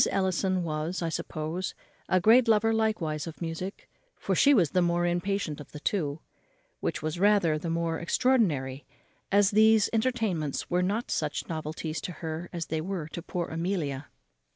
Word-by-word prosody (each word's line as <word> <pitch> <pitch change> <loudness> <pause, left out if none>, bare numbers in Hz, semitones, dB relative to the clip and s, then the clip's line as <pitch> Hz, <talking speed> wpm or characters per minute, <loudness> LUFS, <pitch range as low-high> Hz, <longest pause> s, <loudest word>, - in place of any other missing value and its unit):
Ellison 185 -1 +1
was, 160 +3 -2
I 165 - 0
suppose, 160 +3 -4 0.3
a 185 - +4
great 230 +6 +6
lover 225 0 +4
likewise 175 -9 0
of 160 - -8
music, 170 +3 -5 0.3
for - - -1
she 285 - +5
was 180 - +4
the 180 - +3
more 175 0 +2
impatient 175 -2 -1
of 145 - -14
the 150 - -7
two; 155 -3 -1 0.6
which - - -3
was 155 +2 -2
rather 195 -6 +3
the 165 - -4
more 165 0 -1
extraordinary; 165 - +1 0.5
as 200 0 +4
these 220 0 +5
entertainments 220 - -1
were 180 +1 +3
not 205 +6 -1
such 150 -1 -2
novelties 155 0 -4
to 180 - -5
her 160 +1 -5
as 170 -2 -3
they 160 0 -2
were 175 -2 -4
to 170 - -6
poor 175 0 -4
Amelia. 160 -5 -2
175 Hz, 165 wpm, -28 LUFS, 155-200 Hz, 0.6 s, great